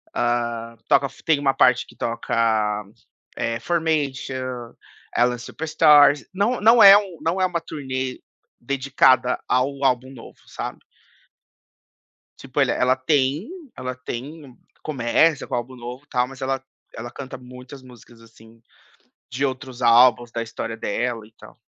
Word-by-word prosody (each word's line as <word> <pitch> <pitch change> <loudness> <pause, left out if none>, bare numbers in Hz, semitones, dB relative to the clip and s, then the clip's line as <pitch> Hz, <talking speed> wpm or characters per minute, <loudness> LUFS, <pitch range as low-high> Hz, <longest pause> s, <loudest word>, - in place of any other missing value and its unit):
hã, 120 -1 -1
toca 140 0 +4
f - - -18
tem 160 -3 +3
uma 135 -1 +1
parte 125 0 +3
que - - -18
toca, 110 -2 -1 0.5
eh, 115 0 -2
Formation, 135 -5 -2 0.4
Alien 120 +1 +2
Superstar. 150 +2 +4 0.2
Não 205 +6 0
não 225 +2 +6
é 200 0 +10
um 190 -5 -4
não 170 +4 -1
é 185 - +3
uma 175 -2 -2
turnê 130 -4 -5 0.4
dedicada 130 -1 +2
ao 135 +2 0
álbum 130 0 +1
novo, 120 -4 -13
sabe? - - -6 1.6
tipo - - -3
ele - - +2
ela 125 +1 +2
tem 140 - 0 0.3
ela 125 0 -5
tem 130 +2 -8 0.3
começa 145 +2 +1
com - - -3
o - - 0
álbum 120 +2 -6
novo 125 +3 -9
e - - -48
tal, 125 -3 0
mas 135 0 -12
ela 135 0 -2 0.3
ela 120 +2 -8
canta 130 0 -8
muitas 125 +2 -12
músicas, 120 -2 -17
assim, 115 0 -19 0.7
de 135 +3 -1
outros 130 -1 -6
álbuns, 120 0 +5
da 115 0 -3
história 115 0 -6
dela 115 +1 -3
e 110 - -20
tal. - - -17
130 Hz, 145 wpm, -22 LUFS, 120-140 Hz, 1.6 s, é